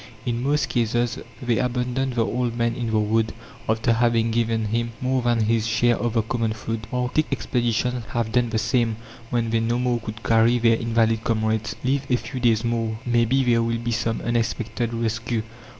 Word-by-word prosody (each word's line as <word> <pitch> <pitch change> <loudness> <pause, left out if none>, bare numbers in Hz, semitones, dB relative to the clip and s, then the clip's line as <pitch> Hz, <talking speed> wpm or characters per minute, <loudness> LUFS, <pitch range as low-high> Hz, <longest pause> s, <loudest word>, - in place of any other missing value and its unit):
In 120 -1 -1
most 145 +3 +1
cases, 120 0 0 0.2
they 120 -2 +1
abandon 125 +1 -1
the 120 -3 0
old 120 -1 -1
man 115 0 +1
in 120 -1 -3
the 110 - +1
wood, 110 +1 +1 0.4
after 110 +1 +2
having 115 -1 +2
given 115 -1 0
him 115 +1 -1
more 130 0 0
than 120 -1 +2
his 110 0 +1
share 120 +1 +3
of 120 -1 -2
the 115 -2 +2
common 115 -1 -1
food. 110 +1 -5
Arctic 125 +5 0
expeditions 120 0 0
have 115 0 -1
done 120 0 +2
the 115 - -1
same 115 0 +1 0.3
when 115 -2 0
they 115 - +2
no 115 +1 0
more 125 -1 +1
could 110 0 -8
carry 115 +1 +4
their 115 -1 +4
invalid 115 -1 +1
comrades. 110 0 0
"Live 135 +1 0
a 125 - +4
few 120 +3 -6
days 115 -2 +3
more, 115 -2 -1
maybe 120 +2 +2
there 120 -2 +3
will 115 0 0
be 120 +1 -3
some 115 0 -1
unexpected 115 0 -1
rescue!" 115 0 -2
115 Hz, 190 wpm, -23 LUFS, 115-120 Hz, 0.4 s, carry